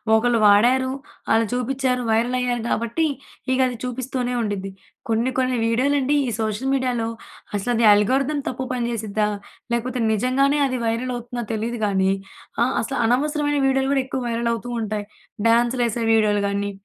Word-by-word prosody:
ఒకళ్ళు 235 Hz, +1 st, +2 dB
వాడారు, 245 Hz, +6 st, +5 dB, 0.4 s
అలా 225 Hz, 0 st, +4 dB
చూపిచ్చారు, 250 Hz, 0 st, 0 dB
వైరల్ 235 Hz, +3 st, +1 dB
అయ్యారు 245 Hz, -2 st, -1 dB
గాబట్టి 235 Hz, +8 st, 0 dB, 0.5 s
ఇగది 255 Hz, -1 st, +1 dB
చూపిస్తూనే 250 Hz, 0 st, -3 dB
ఉండిద్ది. 200 Hz, -3 st, -3 dB, 0.4 s
కొన్ని 230 Hz, +3 st, +1 dB
కొన్ని 255 Hz, 0 st, +1 dB
వీడియోలండి 275 Hz, +4 st, +2 dB
ఈ -, -, 0 dB
సోషల్ 220 Hz, +4 st, -1 dB
మీడియాలో 250 Hz, -4 st, 0 dB, 0.5 s
అసలది 230 Hz, +3 st, +1 dB
అల్గారిథం 265 Hz, +8 st, +2 dB
తప్పు 260 Hz, +1 st, -3 dB
పని 240 Hz, -2 st, -1 dB
చేసిద్దా? 215 Hz, -2 st, -1 dB, 0.4 s
లేకపోతే 245 Hz, +1 st, -1 dB
నిజంగానే 270 Hz, +6 st, +2 dB
అది 255 Hz, -, -2 dB
వైరల్ 230 Hz, +3 st, -1 dB
అవుతుందా 240 Hz, 0 st, -5 dB
తెలీదు 230 Hz, +2 st, -3 dB
గానీ, 190 Hz, -1 st, +2 dB, 0.5 s
ఆ! -, -, +6 dB, 0.2 s
అసలు 265 Hz, +4 st, -3 dB
అనవసరమైన 290 Hz, +3 st, +1 dB
వీడియోలు 270 Hz, 0 st, +1 dB
గూడా 270 Hz, -, +2 dB
ఎక్కువ 260 Hz, 0 st, -3 dB
వైరల్ 235 Hz, 0 st, -1 dB
అవుతూ 235 Hz, +1 st, -5 dB
ఉంటాయి. 215 Hz, -1 st, -3 dB, 0.4 s
డాన్సులేసే 235 Hz, 0 st, +2 dB
వీడియోలు 210 Hz, -2 st, +3 dB
గాని, 200 Hz, 0 st, -1 dB
240 Hz, 145 wpm, -22 LUFS, 225-260 Hz, 0.5 s, ఆ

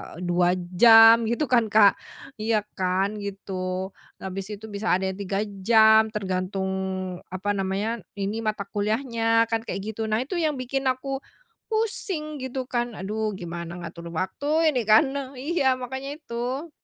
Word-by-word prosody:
e 175 Hz, -, -8 dB
2 175 Hz, 0 st, +2 dB, 0.2 s
jam 225 Hz, +1 st, +8 dB
gitu 235 Hz, +6 st, 0 dB
kan, 240 Hz, -3 st, +4 dB
Kak. 210 Hz, -1 st, +5 dB, 0.4 s
Iya 215 Hz, 0 st, +1 dB, 0.2 s
kan 190 Hz, +3 st, 0 dB
gitu. 190 Hz, -2 st, -4 dB, 0.3 s
Habis 195 Hz, +2 st, -5 dB
itu 215 Hz, +2 st, -9 dB
bisa 205 Hz, +2 st, -1 dB
ada 190 Hz, +1 st, +1 dB
yang 190 Hz, -, -6 dB
3 195 Hz, 0 st, -2 dB, 0.3 s
jam, 220 Hz, -1 st, +6 dB
tergantung, 190 Hz, -1 st, -2 dB, 0.6 s
apa 190 Hz, +2 st, -3 dB
namanya, 195 Hz, +4 st, -1 dB, 0.2 s
ini 200 Hz, +2 st, -3 dB
mata 215 Hz, -1 st, -1 dB
kuliahnya 225 Hz, +1 st, +1 dB
kan 225 Hz, 0 st, -1 dB
kayak 195 Hz, -, -4 dB
gitu. 220 Hz, +1 st, -3 dB
Nah, 215 Hz, +1 st, 0 dB
itu 290 Hz, +8 st, -4 dB
yang 315 Hz, -3 st, +1 dB
bikin 270 Hz, +1 st, -3 dB
aku 265 Hz, +1 st, -1 dB, 0.5 s
pusing 385 Hz, -9 st, -2 dB
gitu 260 Hz, 0 st, -4 dB
kan. 240 Hz, -1 st, -1 dB
Aduh, 215 Hz, +2 st, -3 dB
gimana 170 Hz, -2 st, -6 dB
ngatur 170 Hz, 0 st, -8 dB
waktu 290 Hz, -, +1 dB
ini 250 Hz, -6 st, -1 dB
kan 215 Hz, +6 st, +6 dB
ne 280 Hz, 0 st, -2 dB
iya, 270 Hz, 0 st, +1 dB
makanya 265 Hz, +3 st, -5 dB
itu. 260 Hz, +2 st, -4 dB
220 Hz, 155 wpm, -25 LUFS, 195-255 Hz, 0.6 s, jam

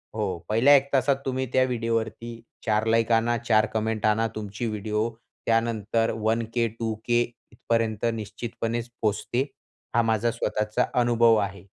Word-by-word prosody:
हो, 100 Hz, -5 st, -1 dB
पहिल्या 120 Hz, +7 st, +6 dB
1 140 Hz, 0 st, +3 dB
तासात 135 Hz, +1 st, +3 dB
तुम्ही 130 Hz, 0 st, -1 dB
त्या 130 Hz, -, +5 dB
व्हिडिओवरती 115 Hz, -1 st, -2 dB, 0.2 s
4 110 Hz, -1 st, +2 dB
लाइक 115 Hz, +1 st, +2 dB
आणा, 115 Hz, +1 st, +3 dB
4 110 Hz, -2 st, +3 dB
कमेंट 110 Hz, -1 st, -1 dB
आणा, 110 Hz, +1 st, +3 dB
तुमची 105 Hz, +1 st, -4 dB
व्हिडिओ 105 Hz, +1 st, -1 dB, 0.4 s
त्यानंतर 115 Hz, -1 st, +1 dB
वन 110 Hz, +1 st, +1 dB
के, 120 Hz, -1 st, +2 dB
टू 115 Hz, 0 st, -3 dB
के 120 Hz, 0 st, +3 dB, 0.3 s
इथपर्यंत 115 Hz, -2 st, -1 dB
निश्चितपणेच 115 Hz, +2 st, -4 dB
पोचते, 110 Hz, +3 st, 0 dB, 0.5 s
हा 120 Hz, -, +5 dB
माझा 115 Hz, 0 st, +1 dB
स्वतःचा 105 Hz, -1 st, 0 dB, 0.2 s
अनुभव 120 Hz, -1 st, +4 dB
आहे 100 Hz, -2 st, -13 dB
115 Hz, 140 wpm, -26 LUFS, 110-120 Hz, 0.5 s, पहिल्या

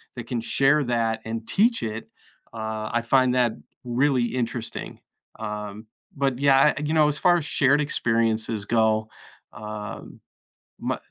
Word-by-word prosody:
that 120 Hz, -, -6 dB
can 120 Hz, -3 st, -3 dB
share 140 Hz, +5 st, +3 dB
that 115 Hz, -2 st, 0 dB
and 115 Hz, 0 st, -5 dB
teach 230 Hz, +4 st, +2 dB
it, 110 Hz, 0 st, -5 dB, 0.4 s
uh, 110 Hz, -1 st, -4 dB
I 120 Hz, -, +2 dB
find 130 Hz, +1 st, +3 dB
that 125 Hz, -2 st, +3 dB, 0.3 s
really 125 Hz, +1 st, +1 dB
interesting. 120 Hz, -1 st, -4 dB, 0.4 s
Um, 105 Hz, 0 st, -6 dB, 0.3 s
but, 135 Hz, -3 st, 0 dB
yeah, 140 Hz, +1 st, +5 dB
eh, -, -, -3 dB
you 155 Hz, -, -1 dB
know, 155 Hz, -2 st, +5 dB
as 150 Hz, 0 st, 0 dB
far 175 Hz, +2 st, +4 dB
as 160 Hz, -, -3 dB
shared 140 Hz, -1 st, +3 dB
experiences 115 Hz, -6 st, 0 dB
go, 110 Hz, -1 st, +2 dB, 0.5 s
um, 105 Hz, 0 st, -8 dB, 0.6 s
m -, -, -1 dB
120 Hz, 145 wpm, -24 LUFS, 110-135 Hz, 0.6 s, yeah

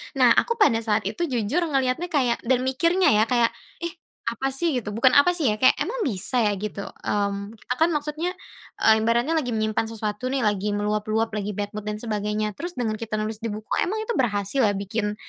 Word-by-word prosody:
Nah, -, -, +5 dB
aku 465 Hz, -1 st, +3 dB
pada 285 Hz, -, +4 dB
saat 220 Hz, -2 st, 0 dB
itu 345 Hz, -, -2 dB
jujur 260 Hz, +7 st, 0 dB
ngelihatnya 270 Hz, +3 st, 0 dB
kayak 250 Hz, -6 st, +2 dB
dan 255 Hz, 0 st, +2 dB
mikirnya 335 Hz, +8 st, +3 dB
ya, 215 Hz, -, +5 dB
kayak, 235 Hz, -1 st, +3 dB, 0.3 s
“Ih, 340 Hz, +2 st, -4 dB, 0.3 s
apa 270 Hz, +4 st, -1 dB
sih?” 295 Hz, +3 st, 0 dB
Gitu. 220 Hz, -4 st, -3 dB
Bukan 245 Hz, +4 st, +3 dB
apa 285 Hz, +5 st, +6 dB
sih 310 Hz, -6 st, +1 dB
ya, -, -, -2 dB
kayak, 255 Hz, +4 st, +4 dB
"Emang 470 Hz, +4 st, -2 dB
bisa 235 Hz, -, 0 dB
ya?" 210 Hz, -, +2 dB
Gitu. 210 Hz, 0 st, -4 dB, 0.2 s
Mmm, 200 Hz, 0 st, -1 dB
kita -, -, -2 dB
kan 325 Hz, +2 st, +4 dB
maksudnya 305 Hz, +4 st, -2 dB, 0.5 s
ah, -, -, +6 dB
ibaratnya, 235 Hz, +6 st, +1 dB
lagi 245 Hz, -6 st, -2 dB
menyimpan 215 Hz, 0 st, 0 dB
sesuatu 220 Hz, +1 st, -4 dB
nih, 265 Hz, -1 st, -1 dB
lagi 205 Hz, -1 st, 0 dB
meluap-luap, 215 Hz, +2 st, 0 dB
lagi 210 Hz, -1 st, -3 dB
bad 205 Hz, 0 st, -3 dB
mood 210 Hz, 0 st, -7 dB
dan 210 Hz, -, -2 dB
sebagainya. 210 Hz, -1 st, -2 dB
Terus 350 Hz, +1 st, -4 dB
dengan 225 Hz, -3 st, -1 dB
kita 225 Hz, -2 st, -4 dB
nulis 215 Hz, 0 st, -3 dB
di 230 Hz, -, -3 dB
buku, 215 Hz, 0 st, -7 dB
emang 435 Hz, +4 st, -2 dB
itu 440 Hz, -, -3 dB
berhasil 205 Hz, 0 st, 0 dB
ya 205 Hz, -, +1 dB
bikin 210 Hz, +1 st, -2 dB
230 Hz, 210 wpm, -24 LUFS, 210-275 Hz, 0.5 s, apa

